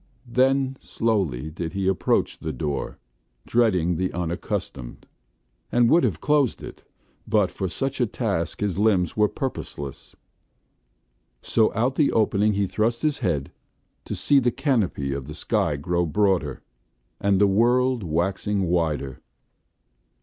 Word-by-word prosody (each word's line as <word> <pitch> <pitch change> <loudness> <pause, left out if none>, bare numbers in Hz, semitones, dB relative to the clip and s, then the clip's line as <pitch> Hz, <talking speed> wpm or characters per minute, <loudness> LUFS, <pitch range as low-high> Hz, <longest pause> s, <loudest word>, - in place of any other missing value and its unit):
Then 130 +2 +1
slowly 90 - -1
did 80 +1 -5
he 95 -1 -1
approach 95 -1 +1
the - - -4
door, 70 +2 -3 0.5
dreading 90 -8 +2
the 90 +1 -1
unaccustomed, 85 -7 -4 0.7
and 120 -1 +4
would 170 +2 +5
have - - 0
closed 145 -5 +1
it, - - -9 0.5
but 105 -3 +2
for 95 - -3
such 135 +9 -2
a 120 - +3
task 100 -7 -2
his 100 -2 -1
limbs 95 -6 +2
were 105 0 +4
purposeless. 75 - -6 1.3
So 110 -1 +2
out 120 +4 +1
the 150 - +3
opening 105 -1 +2
he 100 0 +1
thrust 115 +6 -1
his 150 -2 +1
head, 75 - -1 0.5
to - - -4
see 145 -1 +3
the 125 -2 +2
canopy 115 - 0
of 70 -1 -5
the 75 - -7
sky 75 - 0
grow 85 +4 -1
broader, 95 -6 0 0.6
and 100 -1 +2
the 100 - +6
world 120 +5 +3
waxing 95 +4 -1
wider. 80 -6 -1
100 Hz, 135 wpm, -24 LUFS, 85-120 Hz, 1.3 s, the